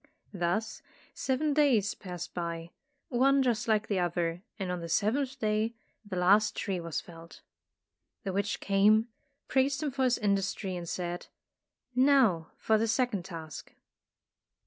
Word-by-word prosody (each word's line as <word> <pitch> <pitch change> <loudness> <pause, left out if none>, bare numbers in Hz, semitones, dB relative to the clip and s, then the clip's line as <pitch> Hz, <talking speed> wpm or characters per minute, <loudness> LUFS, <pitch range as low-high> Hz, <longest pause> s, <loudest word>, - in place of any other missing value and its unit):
Thus 190 +5 -1 0.3
seven 285 +3 0
days 255 -9 +3
passed 180 -2 -7
by, 170 -1 -4 0.4
one 270 +2 +4
just 240 -1 0
like 220 -1 +2
the 200 -3 0
other, 175 -1 -1 0.2
and 190 -3 -3
on 180 - -2
the 170 - -6
seventh 255 - +1
day 220 0 0 0.3
the 205 -3 -6
last 195 +4 +4
tree 195 -4 -2
was 170 -2 -3
felled. 165 -1 -13 0.8
The 195 - -3
witch 200 +2 -1
came, 210 +3 +4 0.4
praised 275 +3 +1
him 295 - -1
for 265 0 0
his 250 -1 +3
industry 200 -2 -1
and 170 -1 -5
said, 175 -1 -4 0.7
"Now 250 - +4
for 220 -1 +2
the 225 - +1
second 225 -5 0
task." 165 -5 -8
205 Hz, 145 wpm, -30 LUFS, 175-245 Hz, 0.8 s, one